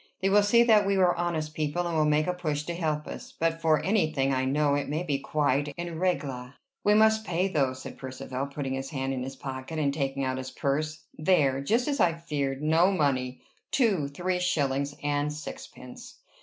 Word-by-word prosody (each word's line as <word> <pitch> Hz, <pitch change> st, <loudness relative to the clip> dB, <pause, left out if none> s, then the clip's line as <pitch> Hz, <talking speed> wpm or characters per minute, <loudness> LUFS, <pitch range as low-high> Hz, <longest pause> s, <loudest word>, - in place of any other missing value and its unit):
They 190 Hz, -, +1 dB
will 205 Hz, +1 st, +6 dB
see 235 Hz, +4 st, +5 dB
that 215 Hz, -4 st, +5 dB
we 200 Hz, 0 st, +2 dB
are 180 Hz, -2 st, +4 dB
honest 160 Hz, -3 st, -2 dB
people, 155 Hz, +3 st, -1 dB
and 170 Hz, -1 st, -2 dB
will 155 Hz, -1 st, +3 dB
make 150 Hz, +1 st, +3 dB
a 180 Hz, -, 0 dB
push 155 Hz, -5 st, -2 dB
to 170 Hz, -, -4 dB
help 155 Hz, -3 st, -2 dB
us. -, -, -9 dB
But 165 Hz, 0 st, 0 dB
for 155 Hz, -2 st, +3 dB
any 195 Hz, -6 st, +2 dB
thing 135 Hz, -2 st, +1 dB
I 130 Hz, 0 st, 0 dB
know 145 Hz, +2 st, +2 dB
it 145 Hz, 0 st, -1 dB
may 155 Hz, +4 st, -1 dB
be 145 Hz, -5 st, -1 dB
quite 145 Hz, 0 st, 0 dB
en 170 Hz, -2 st, -5 dB
règle." 140 Hz, -8 st, -2 dB, 0.3 s
"We 210 Hz, +1 st, +4 dB
must 220 Hz, 0 st, +4 dB
pay, 180 Hz, -1 st, 0 dB
though," 140 Hz, -8 st, +1 dB
said 130 Hz, -, -9 dB
Percivale, 130 Hz, +1 st, -5 dB
putting 140 Hz, -1 st, -4 dB
his 135 Hz, 0 st, -4 dB
hand 135 Hz, -3 st, -2 dB
in 130 Hz, -, -3 dB
his 135 Hz, +1 st, -5 dB
pocket, 130 Hz, +3 st, -6 dB
and 140 Hz, -2 st, +1 dB
taking 135 Hz, -2 st, -2 dB
out 130 Hz, 0 st, -1 dB
his 130 Hz, 0 st, -5 dB
purse. 155 Hz, +1 st, -2 dB, 0.2 s
"There! 150 Hz, -6 st, +3 dB
Just 230 Hz, -, +1 dB
as 285 Hz, -3 st, -1 dB
I 175 Hz, -4 st, +4 dB
feared! 145 Hz, -4 st, -3 dB
No 165 Hz, +5 st, +4 dB
money! 130 Hz, -7 st, 0 dB, 0.3 s
Two 200 Hz, -, +2 dB
three 180 Hz, +6 st, -2 dB
shillings 140 Hz, -5 st, 0 dB
and 145 Hz, 0 st, 0 dB
sixpence!" 140 Hz, -4 st, -9 dB
150 Hz, 210 wpm, -28 LUFS, 135-175 Hz, 0.3 s, will